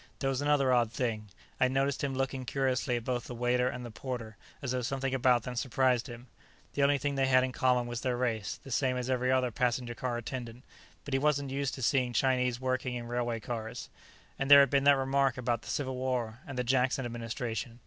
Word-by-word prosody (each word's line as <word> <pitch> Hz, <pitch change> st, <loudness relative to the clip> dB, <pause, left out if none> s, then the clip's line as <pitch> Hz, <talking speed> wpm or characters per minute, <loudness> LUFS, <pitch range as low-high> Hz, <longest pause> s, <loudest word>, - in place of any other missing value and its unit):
There 135 Hz, -1 st, 0 dB
was 135 Hz, 0 st, -2 dB
another 145 Hz, -3 st, +3 dB
odd 120 Hz, -3 st, +2 dB
thing. 115 Hz, -4 st, -2 dB, 0.3 s
I'd 130 Hz, -1 st, +3 dB
noticed 135 Hz, +1 st, 0 dB
him 135 Hz, -2 st, -1 dB
looking 135 Hz, 0 st, -2 dB
curiously 130 Hz, -1 st, 0 dB
at 120 Hz, -, -3 dB
both 125 Hz, -1 st, -2 dB
the 120 Hz, -, -7 dB
waiter 125 Hz, +1 st, +1 dB
and 125 Hz, -1 st, -6 dB
the 120 Hz, -, -7 dB
porter, 115 Hz, -2 st, -6 dB, 0.2 s
as 130 Hz, -3 st, -3 dB
though 130 Hz, 0 st, 0 dB
something 135 Hz, +2 st, -2 dB
about 125 Hz, -2 st, +3 dB
them 125 Hz, 0 st, -5 dB
surprised 125 Hz, -1 st, +1 dB
him. 120 Hz, +1 st, -9 dB, 0.5 s
The 145 Hz, -, -1 dB
only 140 Hz, +1 st, +4 dB
thing 140 Hz, +1 st, -2 dB
they 135 Hz, -1 st, +1 dB
had 130 Hz, -1 st, +5 dB
in 130 Hz, -, -1 dB
common 125 Hz, -1 st, +2 dB
was 120 Hz, -1 st, -4 dB
their 125 Hz, -2 st, -1 dB
race, 115 Hz, -4 st, -2 dB
the 135 Hz, -, -10 dB
same 125 Hz, 0 st, +1 dB
as 125 Hz, +1 st, -2 dB
every 125 Hz, 0 st, +1 dB
other 130 Hz, -1 st, +2 dB
passenger 120 Hz, +1 st, -1 dB
car 125 Hz, -1 st, -3 dB
attendant. 120 Hz, 0 st, -6 dB, 0.4 s
But 140 Hz, -, -5 dB
he 135 Hz, -, +3 dB
wasn't 140 Hz, -1 st, +1 dB
used 135 Hz, -1 st, -2 dB
to 130 Hz, -, -6 dB
seeing 125 Hz, -1 st, +2 dB
Chinese 125 Hz, -2 st, +1 dB
working 130 Hz, -1 st, -1 dB
in 120 Hz, -1 st, -5 dB
railway 120 Hz, -1 st, -1 dB
cars. 115 Hz, +1 st, -5 dB, 0.5 s
And 135 Hz, -, -1 dB
there 140 Hz, 0 st, +11 dB
had 140 Hz, -, +3 dB
been 140 Hz, -1 st, +2 dB
that 140 Hz, -1 st, +7 dB
remark 135 Hz, -1 st, +1 dB
about 120 Hz, -2 st, -1 dB
the -, -, -10 dB
Civil 130 Hz, -2 st, -2 dB
War 125 Hz, -3 st, -2 dB
and 135 Hz, -3 st, -7 dB
the 125 Hz, -, 0 dB
Jackson 130 Hz, +1 st, +1 dB
Administration. 120 Hz, +1 st, -4 dB
125 Hz, 225 wpm, -30 LUFS, 120-135 Hz, 0.5 s, there